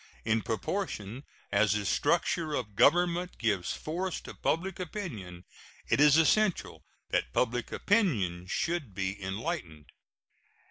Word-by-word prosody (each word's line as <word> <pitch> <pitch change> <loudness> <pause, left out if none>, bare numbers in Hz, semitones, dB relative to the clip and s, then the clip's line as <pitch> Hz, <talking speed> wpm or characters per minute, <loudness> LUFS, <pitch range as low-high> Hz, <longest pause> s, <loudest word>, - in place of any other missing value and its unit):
In 110 0 +2
proportion 115 - -3 0.3
as 100 0 +3
the 105 -1 -1
structure 165 - +1
of 125 - -1
a - - -25
government 175 - +3
gives 100 -6 0
force 180 +4 -3
to - - -9
public 185 +3 -1
opinion, 115 - -6 0.4
it - - +3
is 150 0 +7
essential 190 +4 +2 0.3
that - - 0
public 125 -1 0
opinion 105 - +1
should 150 - -2
be 95 +1 -3
enlightened. 95 - -4
125 Hz, 125 wpm, -30 LUFS, -, 0.4 s, is